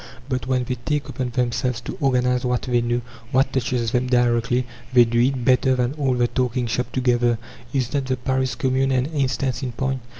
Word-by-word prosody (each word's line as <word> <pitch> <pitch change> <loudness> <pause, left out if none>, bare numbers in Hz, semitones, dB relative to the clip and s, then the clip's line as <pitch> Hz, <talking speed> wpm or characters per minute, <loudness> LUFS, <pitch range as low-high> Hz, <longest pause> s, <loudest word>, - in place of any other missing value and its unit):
But 130 -3 -2
when 130 -1 +1
they 125 0 -3
take 150 -2 -1
upon 130 -1 -3
themselves 125 0 -1
to - - -6
organize 125 -2 +2
what 125 -1 0
they 120 -1 +1
know, 120 +1 0 0.3
what 135 0 +2
touches 120 -3 0
them 125 +1 +1
directly, 120 0 +2 0.3
they 125 -2 +7
do 120 +1 0
it 125 0 +1
better 130 0 +4
than 125 +1 0
all 140 -4 0
the 120 -1 +2
"talking 125 0 -1
shops" 120 +1 -1
put - - -24
together. 120 -2 +2 0.3
Is 130 -1 -1
not 140 -2 0
the 130 0 -1
Paris 130 +1 -1
Commune 135 0 +1
an 130 -1 +2
instance 135 -4 -1
in 125 -3 -4
point? 130 +1 -2
125 Hz, 205 wpm, -22 LUFS, 120-130 Hz, 0.3 s, they